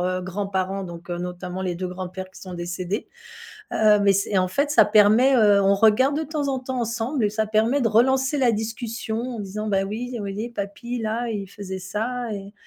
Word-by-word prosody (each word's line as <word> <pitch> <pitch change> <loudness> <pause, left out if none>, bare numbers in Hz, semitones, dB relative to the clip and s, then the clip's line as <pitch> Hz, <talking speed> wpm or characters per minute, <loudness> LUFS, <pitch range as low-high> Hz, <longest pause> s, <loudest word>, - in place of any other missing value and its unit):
heu, 185 +1 0
grands-parents, 195 +1 -2
donc 175 -1 -9
notamment 180 +1 -4
les 180 -2 -2
2 185 +1 -3
grands-pères 185 +1 -6
qui - - -14
sont 185 -1 -8
décédés. 175 +4 -4 0.6
Heu, 210 -1 +4
mais 200 -1 +5
c'est 200 +2 0
et 195 - +3
en 185 - +2
fait, 280 +10 0
ça 220 - +7
permet, 215 +5 +5
heu 205 -3 +5
on 195 +1 +4
regarde 225 +7 +4
de 315 - -1
temps 300 -1 -2
en 265 -1 0
temps 255 -1 -4
ensemble 235 +2 -1
et 205 - -1
ça 220 0 -1
permet 225 +6 +2
de 230 - +2
relancer 265 +5 +3
la 250 -3 +4
discussion 225 +1 -3 0.2
en - - -5
disant: 210 +2 -4
«Bah 195 -1 +1
oui, 225 +5 -4
vous - - -3
voyez, 210 +3 -4
papy 235 +3 -5
là, 225 +2 -2
il 200 -3 -4
faisait 190 -1 -7
ça 225 +5 -3
et 200 0 -7
210 Hz, 215 wpm, -23 LUFS, 190-235 Hz, 0.6 s, ça